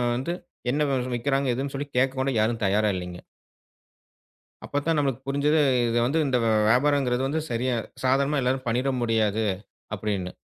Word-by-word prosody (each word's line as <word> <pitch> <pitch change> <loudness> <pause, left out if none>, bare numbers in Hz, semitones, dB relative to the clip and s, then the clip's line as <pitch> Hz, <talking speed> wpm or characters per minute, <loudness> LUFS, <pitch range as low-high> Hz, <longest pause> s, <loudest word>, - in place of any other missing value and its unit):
வந்து 135 +8 -2 0.4
என்ன 150 +2 +1
வி 135 - +1 0.2
விக்கிறாங்க 135 +1 0
இதுன்னு 140 +2 -4
கேக்க 130 +1 +3
கூட 130 +1 +1
யாரும் 115 +1 0
தயாரா 105 +2 +2
இல்லங்க. 90 -1 -6 1.4
அப்பத்தான் 150 +3 -1
நமக்குப் 135 -2 -2
புரிஞ்சது, 145 +3 +2 0.3
இது 115 0 0
வந்து, 145 +6 +1
இந்த 130 -2 +2 0.3
வியாபாரம்ங்கறது 130 +1 +2
வந்து 155 +4 -1
சரியா 125 +2 0 0.3
சாதாரண 140 +3 +2
எல்லாரும் 130 +1 -1
பண்ணிட 125 +4 +1
முடியாது 110 -2 +1 0.5
அப்படின்னு. 100 -3 -3
130 Hz, 140 wpm, -25 LUFS, 115-140 Hz, 1.4 s, கேக்க